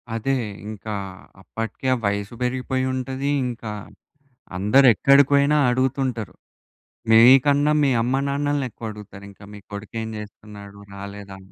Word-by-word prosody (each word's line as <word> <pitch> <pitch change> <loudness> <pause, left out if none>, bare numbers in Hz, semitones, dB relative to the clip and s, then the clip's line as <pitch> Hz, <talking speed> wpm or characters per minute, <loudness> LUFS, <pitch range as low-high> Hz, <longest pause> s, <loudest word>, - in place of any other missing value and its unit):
అదే! 135 +4 -1 0.3
ఇంకా 110 0 -7 0.5
అప్పటికే 115 +7 -6
ఆ - - -4
వయసు 100 +2 -2
పెరిగిపోయుంటది. 130 +1 -2 0.2
ఇంకా 115 -3 -6 0.9
అందరూ 105 +9 +4
ఎక్కడికి 140 +6 +5
పోయినా 140 +1 +3
అడుగుతుంటారు. 130 -3 -1 0.8
మీకన్నా 135 +6 +6
మీ 140 - +3
అమ్మ 125 +3 0
నాన్నలని 145 0 -1
ఎక్కువడుగుతారు 105 -3 -9
ఇంకా. 100 - -18
మీ 105 - -10
కొడుకు 105 +2 -9
ఏం 110 - -6
చేస్తున్నాడు? 100 -1 -12 0.2
రాలేదా? 100 0 -9
120 Hz, 115 wpm, -22 LUFS, 105-135 Hz, 0.9 s, మీకన్నా